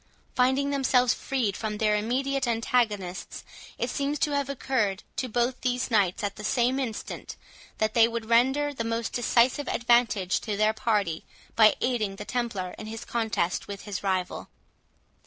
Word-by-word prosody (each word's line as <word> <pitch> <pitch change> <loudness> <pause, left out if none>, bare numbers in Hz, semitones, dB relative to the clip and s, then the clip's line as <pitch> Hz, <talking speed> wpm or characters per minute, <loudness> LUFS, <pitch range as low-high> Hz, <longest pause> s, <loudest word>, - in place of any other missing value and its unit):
Finding 265 +3 +2
themselves 255 -3 +3
freed 240 -7 -1
from 215 -2 -3
their 210 -1 +2
immediate 265 +5 0
antagonists, 225 -5 -1 0.3
it - - -1
seems 285 +1 -1
to 295 - 0
have 280 -1 0
occurred 235 -8 -1
to 255 - -2
both 240 +2 0
these 250 0 -1
knights 200 -3 +2
at 200 -1 -3
the 210 - -8
same 250 +4 +1
instant, 235 -5 -5 0.4
that 215 0 0
they 230 -1 +6
would 230 -1 -4
render 265 +6 +3
the 235 - -3
most 230 0 -2
decisive 245 +3 +2
advantage 235 -6 +2
to 210 -3 -3
their 215 +1 +3
party, 210 -9 0 0.3
by 215 -1 +6
aiding 220 -6 0
the 210 - -8
Templar 210 -8 -3
in 215 - -7
his 225 +1 -7
contest 220 -7 -1
with 200 -1 -7
his 205 -3 -5
rival. 185 -2 -2
230 Hz, 160 wpm, -27 LUFS, 210-255 Hz, 0.4 s, they